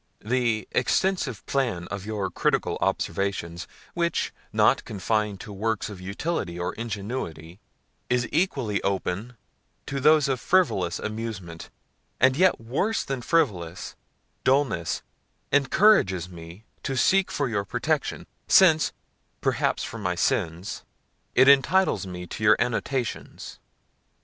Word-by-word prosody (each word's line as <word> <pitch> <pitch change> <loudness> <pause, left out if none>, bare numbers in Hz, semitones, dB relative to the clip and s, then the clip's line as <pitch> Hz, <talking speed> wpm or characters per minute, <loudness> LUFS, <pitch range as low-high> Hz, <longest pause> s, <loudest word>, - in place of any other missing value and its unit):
The 120 -2 0
extensive 180 - 0
plan 115 -11 -1
of 100 0 -6
your 105 -3 -2
critical - - 0
observations, 85 -4 -2 0.3
which, 170 -1 -1 0.2
not - - +3
confined 105 0 -1
to 105 - -8
works 110 +2 -2
of 95 -3 -9
utility 100 - -3
or 90 - -2
ingenuity, 100 -7 -5 0.5
is 125 -1 +1
equally 135 - 0
open 100 +4 -2 0.5
to 140 - -3
those 150 +1 +5
of 130 -2 0
frivolous 105 - +2
amusement, 110 -6 -6 0.5
and, 130 0 +5
yet 185 +4 +3
worse 135 - -1
than 135 -2 -4
frivolous, 95 - -1 0.5
dullness, 130 - +1 0.5
encourages 135 - +4
me 85 +2 -11 0.2
to 135 - -3
seek 190 +8 +3
for 140 - -1
your 105 -4 -1
protection, 100 - -2 0.2
since, 160 -5 +5 0.5
perhaps - - 0
for - - -6
my - - -1
sins! 85 +4 -1 0.5
it 130 - +6
intitles 140 - +4
me 90 -1 -6
to 110 - -7
your 105 - +7
annotations. 125 +1 -3
115 Hz, 120 wpm, -25 LUFS, 95-140 Hz, 0.5 s, your